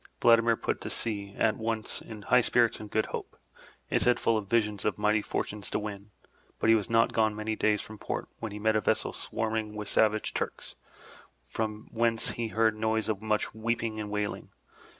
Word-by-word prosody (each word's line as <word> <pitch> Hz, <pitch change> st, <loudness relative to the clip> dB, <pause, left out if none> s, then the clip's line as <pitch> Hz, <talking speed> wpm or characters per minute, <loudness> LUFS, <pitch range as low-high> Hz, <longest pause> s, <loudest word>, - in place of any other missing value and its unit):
Vladimir 115 Hz, -1 st, +5 dB
put -, -, -2 dB
to -, -, -5 dB
sea 100 Hz, -3 st, -1 dB
at 110 Hz, -, +2 dB
once, 110 Hz, -1 st, -1 dB
in 105 Hz, -2 st, -10 dB
high 125 Hz, +3 st, +5 dB
spirits 120 Hz, -1 st, +3 dB
and 105 Hz, -, -8 dB
good 110 Hz, +1 st, +1 dB
hope, -, -, -7 dB, 0.5 s
his -, -, +1 dB
head 125 Hz, -1 st, +4 dB
full 115 Hz, -, +2 dB
of 105 Hz, -3 st, -3 dB
visions 105 Hz, -3 st, +1 dB
of 105 Hz, -, 0 dB
mighty 105 Hz, +1 st, +2 dB
fortunes 105 Hz, 0 st, -3 dB
to -, -, -1 dB
win; 105 Hz, -1 st, -6 dB, 0.5 s
but -, -, +1 dB
he 115 Hz, -, +8 dB
was 105 Hz, -3 st, -1 dB
not 115 Hz, 0 st, +3 dB
gone 110 Hz, -1 st, +2 dB
many 110 Hz, +1 st, -2 dB
days 105 Hz, -1 st, +1 dB
from 110 Hz, -1 st, -10 dB
port -, -, -4 dB
when 110 Hz, -2 st, -4 dB
he 105 Hz, -, -6 dB
met 110 Hz, +1 st, +1 dB
a 110 Hz, -, +3 dB
vessel -, -, +1 dB
swarming 110 Hz, -1 st, -3 dB
with 105 Hz, -1 st, -5 dB
savage 110 Hz, 0 st, +2 dB
Turks, -, -, -3 dB, 0.7 s
from 110 Hz, -1 st, -4 dB
whence 115 Hz, -1 st, +2 dB
he 115 Hz, -1 st, -3 dB
heard 110 Hz, 0 st, +2 dB
noise 110 Hz, 0 st, 0 dB
of 105 Hz, -2 st, -1 dB
much 110 Hz, -1 st, 0 dB
weeping 110 Hz, 0 st, -2 dB
and 105 Hz, -1 st, -4 dB
wailing. 105 Hz, 0 st, -3 dB
110 Hz, 200 wpm, -29 LUFS, 105-115 Hz, 0.7 s, he